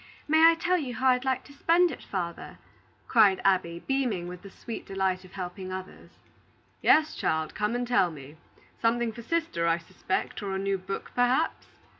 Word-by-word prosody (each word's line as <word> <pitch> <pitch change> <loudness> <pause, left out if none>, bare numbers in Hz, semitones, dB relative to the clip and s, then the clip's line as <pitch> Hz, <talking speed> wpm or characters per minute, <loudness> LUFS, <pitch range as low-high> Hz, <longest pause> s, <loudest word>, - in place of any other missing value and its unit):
May 315 +2 +7
I 330 - +3
tell 355 +2 +1
you 255 -6 -4
how 260 0 +2
I'd 250 +1 +2
like 260 -1 0
to 285 - -15
spend 335 +4 +3
it, - - -8
father?" 175 -3 -5 0.5
cried 210 -5 +5
Abby, 175 -3 +1
beaming 245 -10 -1
with 180 0 -8
the 200 - -11
sweet 225 +3 -7
delight 190 -1 -1
of 185 - -16
helping 185 0 -6
others. 185 0 -8 0.7
"Yes, 310 0 +4
child; 160 -1 -1
come 210 +2 -1
and 245 0 -2
tell 235 -7 +3
me. 150 -1 -11 0.4
Something 235 0 +1
for 235 - -9
sister, 240 - -1
I 165 0 +3
suspect; 170 +4 -4
or 195 -2 -3
a - - 0
new 195 0 -1
book, 190 +2 -6
perhaps." 250 +6 +1
205 Hz, 185 wpm, -28 LUFS, 185-260 Hz, 0.7 s, May